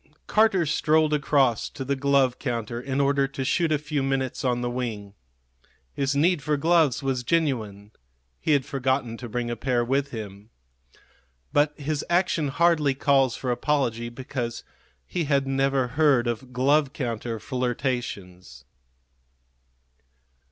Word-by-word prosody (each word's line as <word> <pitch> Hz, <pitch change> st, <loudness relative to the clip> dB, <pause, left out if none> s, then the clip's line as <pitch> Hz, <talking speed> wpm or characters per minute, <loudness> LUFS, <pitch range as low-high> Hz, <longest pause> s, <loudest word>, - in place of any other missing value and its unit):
Carter 210 Hz, -5 st, +3 dB
strolled 155 Hz, 0 st, +2 dB
across 140 Hz, -5 st, +2 dB
to 135 Hz, -, -7 dB
the 140 Hz, +1 st, 0 dB
glove 135 Hz, -2 st, +2 dB
counter 120 Hz, -2 st, -3 dB
in 135 Hz, +1 st, -2 dB
order 140 Hz, 0 st, +2 dB
to 135 Hz, -1 st, -5 dB
shoot 165 Hz, +3 st, +1 dB
a 155 Hz, -, +3 dB
few 145 Hz, 0 st, -3 dB
minutes 135 Hz, -1 st, -2 dB
on 125 Hz, -2 st, 0 dB
the 120 Hz, -, -1 dB
wing. 110 Hz, -5 st, -4 dB, 0.8 s
His 140 Hz, 0 st, -1 dB
need 165 Hz, +2 st, +2 dB
for 150 Hz, +2 st, 0 dB
gloves 160 Hz, -3 st, +2 dB
was 135 Hz, -2 st, -1 dB
genuine; 115 Hz, -9 st, -1 dB, 0.5 s
he 155 Hz, -, +1 dB
had 140 Hz, -3 st, +2 dB
forgotten 130 Hz, -3 st, -1 dB
to 120 Hz, -1 st, -8 dB
bring 120 Hz, +1 st, -2 dB
a -, -, -2 dB
pair 120 Hz, -1 st, 0 dB
with 135 Hz, +3 st, 0 dB
him. 105 Hz, -3 st, -8 dB, 1.0 s
But 150 Hz, +1 st, +2 dB
his 145 Hz, 0 st, -2 dB
action 175 Hz, -3 st, +1 dB
hardly 155 Hz, -1 st, +2 dB
calls 135 Hz, -2 st, +2 dB
for 125 Hz, -, -3 dB
apology, 120 Hz, -3 st, 0 dB
because 120 Hz, -1 st, -5 dB, 0.4 s
he 170 Hz, -, -2 dB
had 140 Hz, -1 st, +1 dB
never 135 Hz, -1 st, +1 dB
heard 140 Hz, -2 st, +3 dB
of 120 Hz, +2 st, -4 dB
glove 135 Hz, +3 st, +2 dB
counter 115 Hz, -3 st, -4 dB
flirtations. 115 Hz, -, -4 dB
135 Hz, 140 wpm, -25 LUFS, 120-145 Hz, 1.0 s, Carter